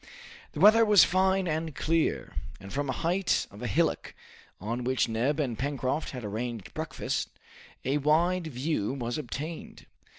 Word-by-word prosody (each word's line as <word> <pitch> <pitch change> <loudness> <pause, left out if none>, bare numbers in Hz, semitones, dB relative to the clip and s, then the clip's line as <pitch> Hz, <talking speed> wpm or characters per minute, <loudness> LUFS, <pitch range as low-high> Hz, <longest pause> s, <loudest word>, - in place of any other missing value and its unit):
The - - -6
weather 215 +5 +7
was 210 -3 +7
fine 190 +1 +2
and 160 -2 -2
clear, 165 0 0 0.3
and 95 0 -10
from 145 -1 -1
a - - +2
height 175 +7 0
of 100 - -12
a 125 - -2
hillock 165 +4 0 0.4
on 115 +5 -3
which 130 0 +1
Neb 120 +7 0
and 125 -7 -1
Pencroft 140 +1 -1
had 125 -4 -6
arranged 115 0 -5
breakfast, - - -3 0.6
a 140 +3 +1
wide 165 +4 +2
view 130 -4 -2
was 120 +1 -3
obtained. 150 +4 -6
145 Hz, 155 wpm, -28 LUFS, 125-165 Hz, 0.6 s, weather